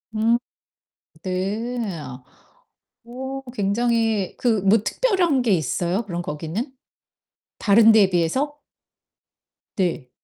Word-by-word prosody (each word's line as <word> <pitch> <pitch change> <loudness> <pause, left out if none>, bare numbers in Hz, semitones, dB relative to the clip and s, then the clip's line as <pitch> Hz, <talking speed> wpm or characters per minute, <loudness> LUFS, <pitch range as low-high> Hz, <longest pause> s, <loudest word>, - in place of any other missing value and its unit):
음. 225 +2 +3 0.9
네. 200 +7 -2 1.3
어 265 +3 -6
굉장히 225 -1 0
그 225 -5 +1
뭐 200 +4 +4
특별한 360 - +1
게 240 -3 +1
있어요, 175 - 0
그럼 175 -3 -4
거기는 170 - -4 0.9
다른 220 +2 +6
데에 210 -3 +5
비해서? 225 - 0 1.2
네. 175 -9 -1
220 Hz, 165 characters per minute, -22 LUFS, 185-245 Hz, 1.3 s, 다른